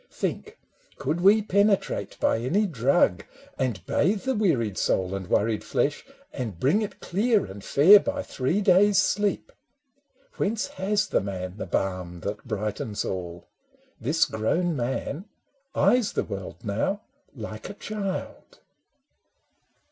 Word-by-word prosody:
Think, - - -4 0.4
could 155 +6 -2
we 205 +3 +6
penetrate 200 0 +1
by - - +2
any 170 - +1
drug 125 - +2 0.4
And 120 -8 -2
bathe 195 +6 +1
the 265 - 0
wearied 135 - +1
soul 95 0 0
and 95 -2 -4
worried 110 +3 +1
flesh, 145 - -1 0.3
And 110 -10 -5
bring 150 - +3
it 210 - -5
clear 215 +3 +1
and 100 +1 -10
fair, 180 - +7
by 285 +5 -3
three 140 +10 -1
days' 200 +1 +5
sleep! 200 +2 +1 0.9
Whence 215 +2 0
has 210 -7 0
the - - +2
man 95 -1 -5
the 100 - -5
balm 90 -1 -2
that 105 +3 -4
brightens 105 -1 -3
all? 90 -2 -5 0.5
This 145 +8 +2
grown 160 +11 0
man 135 +7 -3 0.5
eyes 245 -4 +3
the - - 0
world 100 +3 -7
now 115 - -1 0.3
like 110 -2 -7
a 200 - -8
child. 200 -3 -5
140 Hz, 135 wpm, -26 LUFS, -, 0.9 s, fair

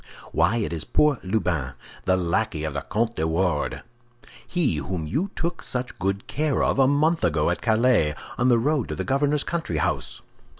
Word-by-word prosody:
"Why, 85 +8 +2
it 105 -6 -2
is 80 - -2
poor 150 -5 +2
Lubin, 90 - -1 0.3
the 95 0 +3
lackey 85 -2 0
of 75 -2 -2
the 70 - -2
Comte 115 - -1
de 80 - +1
Wardes—he 120 - -2
whom 80 +3 -3
you 155 - -1
took 170 -1 -2
such 125 0 -4
good 100 +1 -1
care 150 -1 0
of - - +1
a 135 - +6
month 155 +4 +2
ago 80 0 +2
at 85 - -3
Calais, 110 -9 +3 0.2
on 125 +3 +2
the 120 - +5
road 140 +2 0
to - - -3
the - - -3
governor's 145 +2 +1
country 165 - -2
house!" 75 - -2
110 Hz, 180 wpm, -24 LUFS, 85-140 Hz, 0.3 s, a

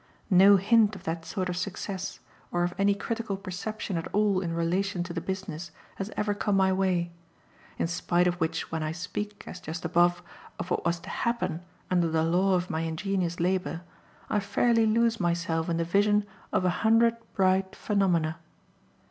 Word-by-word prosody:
No 195 +2 +8
hint 210 +2 +4
of 190 - -11
that 165 -1 -3
sort 185 -3 -2
of 180 - -2
success, 190 - -4 0.3
or 175 0 +1
of 175 0 -1
any 200 0 +4
critical 225 -1 -3
perception 195 +1 -4
at 165 - -3
all 205 -2 +3
in 170 -3 -2
relation 175 +2 0
to 175 -1 -6
the 165 - -3
business, 190 -3 -5 0.3
has 195 +1 -4
ever 210 0 +1
come 205 -1 0
my 190 0 +4
way; 185 -2 +1 0.7
in - - 0
spite 175 +1 +1
of 180 - +3
which 160 0 -1
when 160 0 -2
I 155 0 -2
speak, 205 +5 -5
as 180 - -8
just 165 -1 -6
above, 175 +1 +3 0.3
of 175 - -6
what - - 0
was 170 0 0
to - - -10
"happen" 185 -9 -1 0.3
under 175 -2 +3
the 160 0 +1
law 185 +4 +3
of 180 0 0
my 160 -3 -2
ingenious 175 +2 -2
labour, 180 -1 0 0.5
I 210 - +1
fairly 225 +3 +2
lose 230 +1 +2
myself 170 -2 0
in 165 - 0
the 170 - +1
vision 205 +3 +3 0.3
of 185 - +1
a 180 - +3
hundred 230 +1 +4 0.2
bright 190 -1 +2
phenomena. 170 -6 +1
185 Hz, 180 wpm, -28 LUFS, 170-200 Hz, 0.7 s, No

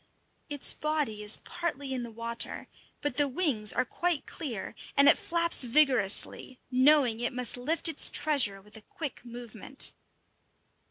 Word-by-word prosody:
] - - -44
Its 290 -2 +5
body 300 -9 -3
is 210 +1 +4
partly 285 -6 -5
in 255 - -4
the 235 - -7
water, 230 +1 -3 0.3
but 290 -4 -3
the 290 -1 +2
wings 260 - +2
are - - -1
quite 345 +2 -3
clear, 245 - -7 0.2
and 280 0 +5
it - - +6
flaps 335 -3 +1
vigorously, 255 -2 +1
knowing 255 -3 +3
it 240 - -2
must 250 -2 0
lift 295 +8 0
its 325 - +3
treasure 260 -10 +2
with 210 +1 -18
a 220 - -11
quick 285 +5 -8
movement. 240 +2 -7
255 Hz, 155 wpm, -28 LUFS, 230-300 Hz, 0.3 s, it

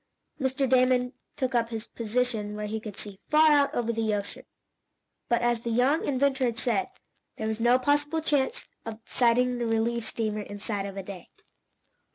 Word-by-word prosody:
Mr. 265 0 0
Damon 255 0 +3 0.2
took 260 -1 -1
up 230 -1 +1
his 225 -1 -5
position 225 -2 -2
where 210 0 -4
he 220 +1 -3
could 215 -2 -9
see 200 -2 -6
far 310 +1 +6
out 285 -1 +3
over 235 -1 0
the 220 -2 0
ocean, 200 0 -6 0.8
but, 235 0 +2
as 240 -1 +2
the 235 - -5
young 255 +7 +2
inventor 270 -1 +1
had 235 -2 -1
said, 235 - 0 0.5
there 220 - -3
was 220 0 -2
no 240 +2 +5
possible 290 +4 +1
chance 300 - 0 0.2
of 225 -1 -7
sighting 245 0 +2
the 235 - -1
relief 225 +1 0
steamer 215 -2 -2
inside 205 0 -4
of 195 0 -8
a 195 - -4
day. 185 -2 -9
235 Hz, 180 wpm, -27 LUFS, 220-260 Hz, 0.8 s, far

